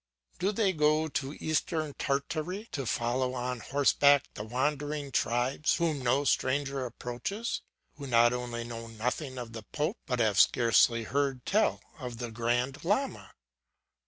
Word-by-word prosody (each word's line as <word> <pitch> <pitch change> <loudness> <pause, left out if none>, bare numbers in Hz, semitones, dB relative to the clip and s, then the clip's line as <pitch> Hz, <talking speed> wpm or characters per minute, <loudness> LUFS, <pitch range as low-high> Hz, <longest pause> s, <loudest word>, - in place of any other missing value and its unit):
Do 195 +3 +1
they 205 -2 +1
go 155 0 +2
to 140 -1 -3
Eastern 155 -1 -1
Tartary 155 +11 -2
to 135 -4 -3
follow 125 +3 0
on 125 0 -3
horseback 140 +1 +4
the 105 - -6
wandering 145 +4 -2
tribes, 125 +6 +1
whom 160 -5 0
no 130 +3 +2
stranger 135 -1 0
approaches, 125 - -4 0.4
who 140 -1 -7
not 120 -1 +5
only 120 -1 -3
know 115 -1 -7
nothing 125 +5 -3
of 120 -2 -6
the 115 - -6
pope, 150 +8 -3
but 125 - 0
have 110 -4 +2
scarcely 115 0 +4
heard 135 +1 -1
tell 215 +2 +2 0.2
of 125 -2 -6
the 120 -1 -5
Grand 120 +4 -1
Lama! 215 +10 -1
135 Hz, 145 wpm, -30 LUFS, 120-150 Hz, 0.4 s, not